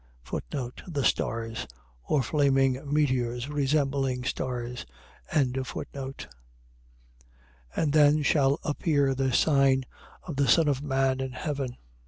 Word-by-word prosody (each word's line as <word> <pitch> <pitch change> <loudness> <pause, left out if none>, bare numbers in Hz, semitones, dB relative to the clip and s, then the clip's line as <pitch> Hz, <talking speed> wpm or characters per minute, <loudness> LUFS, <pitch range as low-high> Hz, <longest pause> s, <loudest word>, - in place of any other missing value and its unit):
The 140 +3 -4
stars.. 115 0 -1 0.4
.Or 140 -3 +1
flaming 135 -1 +2
meteors 130 -4 0
resembling 135 -3 0
stars. 125 - -3 0.4
24:30. 135 0 -2 1.5
And 150 -3 +1
then 150 0 +5
shall 140 0 +3
appear 145 -3 +1
the 135 0 0
sign 135 -1 +3 0.4
of 160 -6 -6
the 140 -1 +2
Son 165 -2 +5
of 140 -2 +1
man 135 -2 +1
in 130 -1 -4
heaven. 135 -3 -4
135 Hz, 105 wpm, -27 LUFS, 130-145 Hz, 1.5 s, then